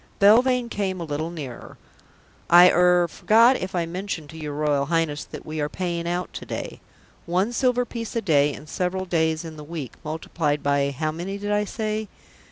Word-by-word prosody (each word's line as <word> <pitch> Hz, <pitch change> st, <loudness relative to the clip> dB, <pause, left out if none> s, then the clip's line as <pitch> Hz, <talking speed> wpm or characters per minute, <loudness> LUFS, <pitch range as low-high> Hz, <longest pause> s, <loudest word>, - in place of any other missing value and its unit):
Belvane 245 Hz, +4 st, +5 dB
came 195 Hz, -4 st, -2 dB
a -, -, -3 dB
little 155 Hz, +1 st, -3 dB
nearer. 145 Hz, -8 st, -8 dB, 0.7 s
"I 175 Hz, +1 st, +8 dB
er 180 Hz, 0 st, +4 dB
forgot 230 Hz, +9 st, +4 dB
if 185 Hz, 0 st, -5 dB
I 170 Hz, -1 st, +1 dB
mentioned 170 Hz, -3 st, -5 dB
to 160 Hz, -, -10 dB
your 150 Hz, -2 st, -5 dB
Royal 145 Hz, -2 st, +1 dB
Highness 165 Hz, -2 st, 0 dB
that -, -, -10 dB
we 155 Hz, 0 st, -4 dB
are 145 Hz, -, -1 dB
paying 170 Hz, -1 st, -3 dB
out 175 Hz, +1 st, -3 dB
today. -, -, -6 dB, 0.5 s
One 185 Hz, +7 st, +1 dB
silver 250 Hz, 0 st, +2 dB
piece 230 Hz, -2 st, -6 dB
a 230 Hz, -, +1 dB
day 145 Hz, -5 st, +3 dB
and 150 Hz, -, -10 dB
several 185 Hz, +3 st, -2 dB
days 160 Hz, -2 st, 0 dB
in 160 Hz, -1 st, -8 dB
the 150 Hz, -, -8 dB
week, 150 Hz, -4 st, -6 dB
multiplied 155 Hz, -1 st, -2 dB
by 140 Hz, 0 st, +2 dB
how 155 Hz, +3 st, -2 dB
many 180 Hz, +5 st, -5 dB
did 205 Hz, +1 st, -4 dB
I 210 Hz, 0 st, +1 dB
say? 215 Hz, 0 st, -3 dB
170 Hz, 185 wpm, -24 LUFS, 155-200 Hz, 0.7 s, I